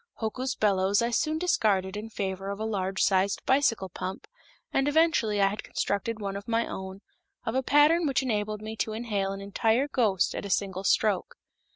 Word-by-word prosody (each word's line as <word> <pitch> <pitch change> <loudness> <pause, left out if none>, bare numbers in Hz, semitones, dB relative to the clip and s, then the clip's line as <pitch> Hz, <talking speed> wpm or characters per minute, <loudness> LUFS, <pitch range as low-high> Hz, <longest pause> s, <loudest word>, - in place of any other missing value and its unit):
Hoku's 255 +4 -3
bellows 200 0 +2
I 235 - 0
soon 310 +6 +1
discarded 205 - +1
in 215 +2 -6
favor 195 -2 -4
of 200 +1 -4
a 220 - -2
large 195 -3 -1
sized 195 0 +1
bicycle 260 -7 +2
pump, 185 +1 -6 0.5
and 270 +1 +2
eventually 290 -9 +2
I 200 - +5
had 200 +2 -2
constructed 215 +3 -2
one 200 -2 -4
of 200 +1 -7
my 230 0 +1
own, 190 +1 -7 0.4
of 225 - -1
a 260 - +1
pattern 300 +5 +4
which 270 -1 +1
enabled 215 -3 -2
me 220 +1 -5
to 215 - -2
inhale 210 -4 -2
an 195 0 -6
entire 220 +6 +1
ghost 215 -10 +1
at - - -4
a 200 - -6
single 190 0 -1
stroke. 200 -1 +1
210 Hz, 190 wpm, -28 LUFS, 195-240 Hz, 0.5 s, I